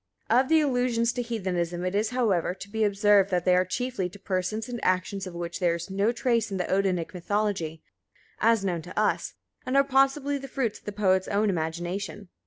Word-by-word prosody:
Of 255 +3 +4
the 320 -1 +5
allusions 245 -4 +1
to 245 - -2
Heathenism 180 -7 -2
it 185 - -1
is, 210 +2 +1
however, 205 -9 +1
to 200 +1 -10
be 220 0 0
observed 205 -1 +4
that 180 -2 0
they 180 -1 +5
are 180 - +4
chiefly 195 0 -2
to 200 - -13
persons 195 +3 -2
and 245 -1 -5
actions 185 +1 0
of 180 - -8
which 170 0 -4
there 175 -2 +2
is 170 +2 -7
no 200 +4 +2
trace 235 -2 0
in 195 - -3
the 180 - 0
Odinic 185 -3 0
mythology, 180 -4 -2 0.6
as 225 -2 +3
known 175 -3 -1
to 175 - -5
us, 215 - 0 0.3
and 255 +2 0
are 275 - +6
possibly 275 +1 +2
the 275 - -8
fruits 250 -5 -2
of - - -32
the 205 - -3
poet's 190 -2 +2
own 205 0 +1
imagination. 175 +4 -4
200 Hz, 205 wpm, -27 LUFS, 180-235 Hz, 0.6 s, are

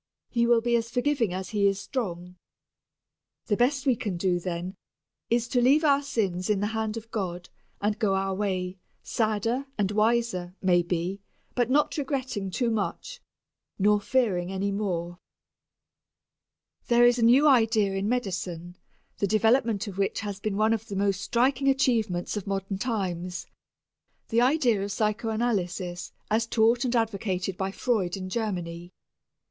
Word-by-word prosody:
He 235 -1 +2
will 235 -1 +4
be 240 0 +1
as 230 0 -3
forgiving 245 -3 +1
as 185 +1 -4
He 205 -2 +2
is 195 0 0
strong. 180 -5 -4 1.1
The 210 - +1
best 265 +4 +1
we 260 -3 +4
can 205 -5 -3
do, 180 0 +1
then, 175 +1 -4 0.5
is 235 0 +1
to 245 - +2
leave 280 +6 +4
our 285 -2 +4
sins 195 -9 -2
in 210 -2 +2
the 205 - 0
hand 220 0 -2
of 225 0 -9
God 180 -4 -4 0.3
and 210 +1 -1
go 200 -3 +2
our 195 0 0
way, 185 -2 -2 0.2
sadder 225 +4 -1
and 200 -2 0
wiser, 215 -4 +1
maybe, 175 +1 0 0.3
but 245 -1 +1
not 295 +4 +2
regretting 260 -8 -2
too 235 +5 0
much, 225 - -3 0.6
not 210 +1 +3
fearing 195 -9 +1
any 195 +1 -1
more. 175 -4 -3 1.7
There 240 -1 +5
is 240 0 +4
a - - +2
new 255 +6 +6
idea 225 -6 +4
in 195 +2 -1
medicine 180 -7 -3 0.4
the 200 - +1
development 220 0 +2
of 200 -2 -7
which 195 - 0
has 205 -2 -5
been 200 -1 -2
one 215 +1 +3
of 225 0 -3
the 200 - -5
most 195 -1 0
striking 260 +5 +1
achievements 225 -10 +1
of 210 -1 -5
modern 195 0 -3
times 185 -6 -3 0.8
the 230 0 +3
idea 250 -6 +3
of 200 - -4
psychanalysis 210 -4 -1 0.2
as 225 +1 +2
taught 230 +2 +3
and 250 0 0
advocated 195 -5 -1
by 190 +1 -2
Freud 195 -4 -1
in 185 -1 -6
Germany. 175 -5 -3
210 Hz, 155 wpm, -27 LUFS, 190-235 Hz, 1.7 s, new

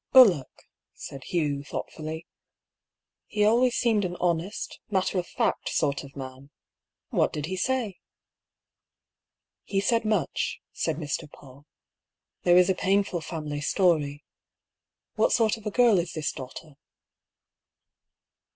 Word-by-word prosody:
" - - -59
Bullock," 195 - +6 0.3
said 135 -1 -9
Hugh, 145 -5 -1
thoughtfully. 155 +2 -6 0.5
" - - -64 0.3
He 210 -1 +1
always 240 +3 +4
seemed 225 -4 +2
an 180 -1 -2
honest, 175 +3 -1
matter 190 -2 +1
of 175 - -4
fact - - -1
sort 140 -2 0
of 140 0 -13
man. 130 0 -8 0.6
What - - +2
did 150 -1 -3
he 185 +3 -3
say? 230 -1 -1 0.5
" - - -64
" - - -64 0.3
He 195 - -1
said 230 +3 +2
much," 215 -9 0
said - - -1
Mr. 150 0 -4
PaulL 140 +1 -16 0.4
" - - -63
There 175 0 +6
is 180 -1 +6
a 190 - +3
painful 190 -1 +1
family 150 -3 -4
story. 150 -4 +1 0.9
What - - +3
sort 225 -3 +3
of 220 -1 -8
a - - +1
girl 235 -4 +5
is 170 0 -3
this 155 -2 -1
daugh 130 -1 -8
ter?" 150 -3 -11
175 Hz, 145 wpm, -27 LUFS, 145-205 Hz, 0.9 s, Bullock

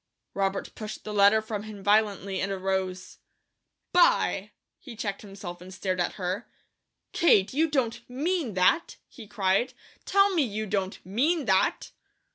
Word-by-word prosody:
Robert 195 0 -2
pushed 215 -1 -7
the 210 - -6
letter 205 +2 +5
from 220 -2 -4
him 210 -2 -9
violently, 205 -2 +1
and 195 - -1
arose 190 -1 -3 0.7
"By 355 0 +3
!" - - -59
he 250 -6 -10
checked 200 -2 -4
himself 195 -4 -9
and 185 +1 -11
stared 185 -1 -3
at 175 - -1
her. 185 +4 -3 0.6
"Kate, 210 - +4
you 320 +4 +2
don't 260 -6 0
MEAN 290 - -1
that!" 185 - +2
he 230 -5 -12
cried. 200 +2 0 0.3
"Tell 395 0 +4
me, 340 - +3
you 215 -4 -2
don't 195 -2 -2
MEAN 280 - +1
that!" 190 -3 +1
205 Hz, 150 wpm, -27 LUFS, 190-245 Hz, 0.7 s, letter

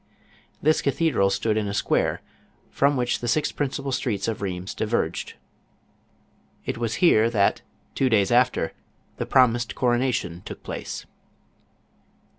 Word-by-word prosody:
This 155 +2 +3
cathedral 140 -8 +2
stood 105 +2 0
in 105 -1 0
a 100 - -3
square, - - 0 0.5
from 140 0 +2
which 125 -1 0
the 120 - -4
six 150 +5 +1
principal 140 -1 -3
streets 105 -6 -1
of 115 - -2
Rlieims 95 -1 -4
diverged. 105 -7 -2 1.3
It - - -3
was 115 -1 -1
here 115 -8 +5
that, 100 -4 +2 0.3
two 135 - +1
days 105 -3 +3
after, 125 +1 +2 0.4
the - - -3
promised 120 -2 +3
coronation 120 -8 0
took - - -9
place. - - -6
120 Hz, 130 wpm, -24 LUFS, 100-130 Hz, 1.3 s, here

